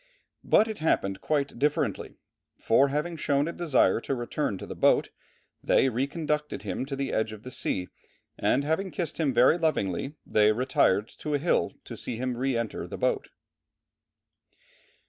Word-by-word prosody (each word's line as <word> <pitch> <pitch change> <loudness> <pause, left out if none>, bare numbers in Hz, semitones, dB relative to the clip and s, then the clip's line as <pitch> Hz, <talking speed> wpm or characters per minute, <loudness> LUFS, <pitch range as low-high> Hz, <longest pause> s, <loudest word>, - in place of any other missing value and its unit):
But 220 - +4
it 220 -2 -5
happened 100 -11 0
quite 140 -5 -1
differently; 150 +1 0 0.4
for 130 +5 +3
having 150 +4 -2
shown 145 0 +1
a - - -2
desire 140 - +2
to 135 - -2
return 120 -2 -2
to - - -8
the - - -6
boat - - +3 0.5
they 135 - +3
reconducted 150 +4 -2
him 130 - -3
to 140 - -3
the 135 0 -3
edge 110 0 0
of 110 0 -11
the 130 - -8
sea, 90 -6 -2 0.5
and 140 - +1
having 160 +6 -1
kissed 170 -3 -4
him 150 -4 +2
very 125 +7 +4
lovingly, 135 - -1
they 105 0 +4
retired 110 -4 +2
to 150 -1 -2
a - - +3
hill 145 - +1
to - - -7
see - - -4
him 125 0 -2
re 130 0 0
enter 115 -2 -3
the - - -7
boat." - - 0
135 Hz, 165 wpm, -27 LUFS, 115-150 Hz, 0.5 s, But